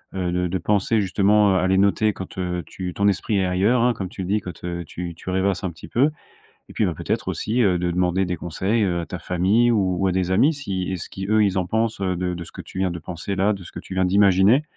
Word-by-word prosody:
heu, 90 Hz, -2 st, -1 dB
de 90 Hz, 0 st, 0 dB
de 95 Hz, -, -1 dB
penser, 105 Hz, +2 st, +1 dB
justement, 100 Hz, +1 st, +3 dB
heu, -, -, +4 dB
à 90 Hz, -, +1 dB
les 95 Hz, 0 st, +3 dB
noter 100 Hz, +2 st, +3 dB
quand, 95 Hz, -1 st, -9 dB
heu, 90 Hz, -1 st, -2 dB
tu 90 Hz, -2 st, -6 dB
ton 100 Hz, -, +1 dB
esprit 100 Hz, +1 st, +1 dB
est 95 Hz, -, +1 dB
ailleurs, 100 Hz, +7 st, +2 dB
hein, 120 Hz, +1 st, +3 dB
comme 100 Hz, -4 st, -5 dB
tu 95 Hz, -, -7 dB
le 90 Hz, -, -4 dB
dis, 105 Hz, +3 st, +1 dB
quand, 90 Hz, -3 st, -9 dB
heu, 85 Hz, -1 st, -4 dB
tu 85 Hz, +1 st, -6 dB
tu 90 Hz, -, -8 dB
rêvasses 95 Hz, 0 st, 0 dB
un 95 Hz, -, -2 dB
petit 80 Hz, -, -12 dB
peu. 140 Hz, +6 st, +3 dB, 0.6 s
Et -, -, -11 dB
puis, 110 Hz, -, +1 dB
bah, 90 Hz, -, -1 dB
peut-être -, -, -2 dB
aussi, 120 Hz, +3 st, -1 dB
heu, 95 Hz, -4 st, +3 dB
de 90 Hz, 0 st, 0 dB
demander 90 Hz, +2 st, +1 dB
des 90 Hz, 0 st, -2 dB
conseils, 95 Hz, +7 st, -1 dB
heu, 85 Hz, -3 st, 0 dB
à -, -, -5 dB
ta -, -, -6 dB
famille 100 Hz, +7 st, +2 dB
ou 95 Hz, -5 st, +1 dB
ou 95 Hz, -, +2 dB
à 95 Hz, -, +2 dB
des 95 Hz, 0 st, 0 dB
amis, 135 Hz, +12 st, +4 dB
si 95 Hz, -11 st, -4 dB
et 95 Hz, -, -2 dB
ce 80 Hz, -, -8 dB
qu'eux, 105 Hz, +3 st, 0 dB
ils 100 Hz, -2 st, +1 dB
en 90 Hz, -, +1 dB
pensent, 110 Hz, -1 st, -1 dB
heu, 95 Hz, -1 st, 0 dB
de 90 Hz, 0 st, -1 dB
de 85 Hz, -, -6 dB
ce -, -, -13 dB
que -, -, -8 dB
tu -, -, -8 dB
viens 95 Hz, -1 st, +1 dB
de 85 Hz, -, -5 dB
penser, 90 Hz, +4 st, -5 dB
là, 100 Hz, +3 st, +3 dB
de 95 Hz, -2 st, -8 dB
ce -, -, -12 dB
que -, -, -7 dB
tu 95 Hz, -, -9 dB
viens 95 Hz, -, +2 dB
d'imaginer, 100 Hz, +6 st, +4 dB
95 Hz, 290 wpm, -22 LUFS, 90-105 Hz, 0.6 s, heu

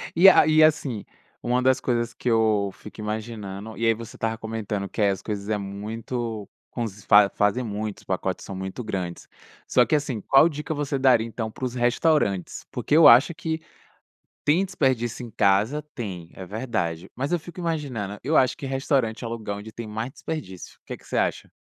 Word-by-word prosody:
E 185 Hz, +4 st, +9 dB
a 185 Hz, -, +6 dB
e 155 Hz, 0 st, +6 dB
assim, 145 Hz, -8 st, +2 dB, 0.4 s
uma 125 Hz, +1 st, +1 dB
das 130 Hz, +1 st, +3 dB
coisas 120 Hz, -1 st, -1 dB
que 125 Hz, -, -3 dB
eu 110 Hz, -3 st, +2 dB
fico 105 Hz, -, -13 dB
imaginando, 105 Hz, -1 st, -5 dB
e 115 Hz, -, -1 dB
aí 115 Hz, -, +5 dB
você 115 Hz, 0 st, -9 dB
estava 115 Hz, 0 st, -2 dB
comentando 110 Hz, -3 st, -4 dB
que -, -, -4 dB
é 100 Hz, -, +4 dB
as 95 Hz, -1 st, -2 dB
coisas 100 Hz, -1 st, -5 dB
é 110 Hz, -, +1 dB
muito, 110 Hz, +2 st, -5 dB, 0.2 s
como 120 Hz, -2 st, -3 dB
se 100 Hz, -1 st, -12 dB
fa 105 Hz, -2 st, +7 dB
fazem 105 Hz, +5 st, +1 dB
muitos, 105 Hz, -1 st, -4 dB
os -, -, -23 dB
pacotes -, -, -2 dB
são 95 Hz, -, -7 dB
muito 95 Hz, +6 st, -5 dB
grandes. 95 Hz, -5 st, -4 dB, 0.4 s
Só -, -, +4 dB
que -, -, +2 dB
assim, 140 Hz, -7 st, -2 dB
qual 135 Hz, +8 st, +6 dB
dica 150 Hz, -1 st, -4 dB
você 145 Hz, -2 st, -2 dB
daria 125 Hz, -4 st, +4 dB
então 110 Hz, -1 st, -4 dB
para 130 Hz, -, -5 dB
os 125 Hz, -, -3 dB
restaurantes? 120 Hz, -, +1 dB
Porque -, -, 0 dB
eu 160 Hz, -1 st, +9 dB
acho 125 Hz, +8 st, +7 dB
que 160 Hz, 0 st, -3 dB, 0.8 s
tem 165 Hz, +6 st, +3 dB
desperdício 130 Hz, -, 0 dB
em -, -, -9 dB
casa, 105 Hz, +9 st, +2 dB
tem, 95 Hz, -, -6 dB
é 95 Hz, -, -8 dB
verdade, 95 Hz, -5 st, -3 dB
mas 135 Hz, +5 st, -2 dB
eu 175 Hz, -, +3 dB
fico 175 Hz, +2 st, -11 dB
imaginando, 140 Hz, -, -3 dB
eu 155 Hz, +3 st, 0 dB
acho 130 Hz, -4 st, +4 dB
que -, -, -7 dB
restaurante 135 Hz, -4 st, 0 dB
é -, -, -3 dB
lugar 110 Hz, -3 st, -4 dB
onde 105 Hz, +2 st, -9 dB
tem 115 Hz, 0 st, -7 dB
mais 110 Hz, +4 st, -4 dB
desperdício. 135 Hz, -, -7 dB
O -, -, -76 dB
que -, -, -6 dB
é -, -, -7 dB
que -, -, -22 dB
você -, -, -2 dB
acha? -, -, -1 dB
115 Hz, 205 wpm, -25 LUFS, 105-135 Hz, 0.8 s, E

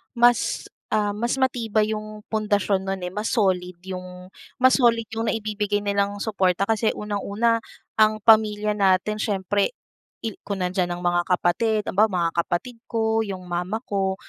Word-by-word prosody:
mas, 240 Hz, 0 st, +2 dB, 0.2 s
ah, 210 Hz, -1 st, +1 dB
mas 235 Hz, +5 st, -1 dB
matibay 225 Hz, -5 st, +1 dB
'yong 215 Hz, 0 st, -6 dB
pundasyon 205 Hz, -3 st, 0 dB
no'n 195 Hz, -1 st, -3 dB
eh, 180 Hz, -, -3 dB
mas 210 Hz, +3 st, -3 dB
solid 185 Hz, -4 st, +1 dB
'yong 185 Hz, 0 st, -8 dB, 0.2 s
mas 260 Hz, +1 st, +4 dB
solid 230 Hz, -2 st, +4 dB
'yong 225 Hz, +1 st, -2 dB
naibibigay 210 Hz, -2 st, -1 dB
nilang 200 Hz, 0 st, 0 dB
suporta. 190 Hz, -3 st, +1 dB
Kasi 220 Hz, +1 st, +1 dB
unang-una, 210 Hz, +2 st, 0 dB, 0.4 s
ang 215 Hz, -1 st, +4 dB
pamilya 215 Hz, -1 st, +4 dB
natin 200 Hz, +1 st, +2 dB
siyempre 200 Hz, -, 0 dB, 0.5 s
il 220 Hz, -, -4 dB
kung 200 Hz, -1 st, -4 dB
nandiyan 180 Hz, 0 st, 0 dB
ang 175 Hz, -, -8 dB
mga 175 Hz, 0 st, +3 dB
kapatid, 200 Hz, +5 st, +1 dB
halimbawa 210 Hz, +3 st, +4 dB
mga 175 Hz, -5 st, 0 dB
kapatid 200 Hz, +8 st, -2 dB
ko, 225 Hz, -1 st, +1 dB
'yong 195 Hz, -4 st, -3 dB
mama 180 Hz, +6 st, -3 dB
ko. 195 Hz, -3 st, -1 dB
205 Hz, 150 wpm, -24 LUFS, 190-220 Hz, 0.5 s, mas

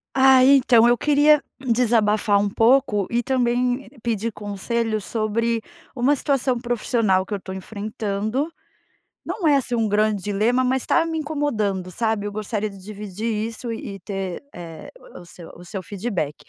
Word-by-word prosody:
Ah, 265 Hz, -1 st, +6 dB
então 255 Hz, -4 st, +6 dB
eu 240 Hz, 0 st, +4 dB
queria 295 Hz, +1 st, +4 dB, 0.2 s
desabafar 220 Hz, -5 st, +2 dB
um 205 Hz, 0 st, 0 dB
pouco 225 Hz, -2 st, +3 dB
e 235 Hz, +1 st, +1 dB
também 250 Hz, +1 st, 0 dB
pedir 230 Hz, -1 st, -2 dB
conselhos 215 Hz, +2 st, -3 dB
sobre 230 Hz, +1 st, -1 dB, 0.3 s
uma 265 Hz, +3 st, +2 dB
situação 265 Hz, -3 st, 0 dB
profissional 230 Hz, -5 st, +1 dB
que 210 Hz, -, -6 dB
eu -, -, 0 dB
estou 190 Hz, 0 st, -8 dB
enfrentando, 215 Hz, -, -3 dB, 0.7 s
não 355 Hz, -, -3 dB
é, 295 Hz, -2 st, +5 dB
assim 260 Hz, -2 st, -1 dB
um 225 Hz, -2 st, +1 dB
grande 210 Hz, -1 st, +1 dB
dilema 215 Hz, +6 st, +1 dB
mas 260 Hz, 0 st, +1 dB
está 330 Hz, -, +2 dB
me 325 Hz, -1 st, -2 dB
incomodando, 225 Hz, -, -2 dB
sabe? 220 Hz, +2 st, -1 dB
Eu 205 Hz, -, -4 dB
gostaria 215 Hz, 0 st, -3 dB
de 200 Hz, -1 st, -12 dB
dividir 210 Hz, +2 st, -5 dB
isso 230 Hz, +1 st, -6 dB
e 200 Hz, -3 st, -6 dB
ter, 190 Hz, -1 st, -5 dB
eh, 165 Hz, -2 st, -9 dB, 0.3 s
o 180 Hz, -, -12 dB
seu 170 Hz, -1 st, -12 dB
o 175 Hz, -, -12 dB
seu 190 Hz, +1 st, -6 dB
feedback, 195 Hz, -8 st, -3 dB
225 Hz, 155 wpm, -22 LUFS, 205-250 Hz, 0.7 s, Ah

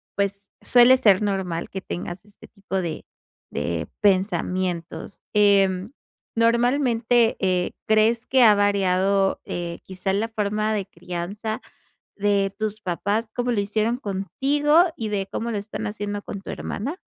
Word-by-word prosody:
pues 200 Hz, 0 st, -2 dB
suele 250 Hz, +1 st, +6 dB
ser 205 Hz, -5 st, +4 dB
normal 190 Hz, -4 st, -2 dB
que 190 Hz, -, -5 dB
tengas 175 Hz, +2 st, -6 dB
este 205 Hz, -1 st, -16 dB
tipo 195 Hz, -2 st, -4 dB
de 165 Hz, -3 st, -5 dB, 0.4 s
de 85 Hz, +3 st, -3 dB
pensamientos. 185 Hz, -3 st, 0 dB
Em, 200 Hz, -1 st, +3 dB, 0.4 s
normalmente, 235 Hz, 0 st, +3 dB
eh, 185 Hz, -2 st, +1 dB, 0.2 s
¿crees 220 Hz, +2 st, +3 dB
que 260 Hz, -1 st, +4 dB
ha 215 Hz, -2 st, +8 dB
variado, 195 Hz, -1 st, +2 dB
eh, 170 Hz, -1 st, -4 dB
quizás 190 Hz, +1 st, -3 dB
la 220 Hz, +3 st, 0 dB
forma 215 Hz, 0 st, -1 dB
de 200 Hz, -3 st, -1 dB
crianza 200 Hz, +4 st, -5 dB, 0.5 s
de 200 Hz, -1 st, +1 dB
tus 215 Hz, -1 st, -3 dB
papás, 200 Hz, +5 st, -1 dB
cómo 245 Hz, 0 st, 0 dB
lo 220 Hz, -, +1 dB
hicieron 215 Hz, +4 st, 0 dB
contigo 270 Hz, -, +2 dB
y 220 Hz, -2 st, -3 dB
de 195 Hz, -2 st, -2 dB
cómo 235 Hz, +1 st, -3 dB
lo 215 Hz, -, -2 dB
están 210 Hz, +1 st, -5 dB
haciendo 205 Hz, -1 st, -4 dB
con 200 Hz, -, -7 dB
tu -, -, -10 dB
hermana? 285 Hz, -, -4 dB
205 Hz, 140 wpm, -23 LUFS, 190-225 Hz, 0.5 s, ha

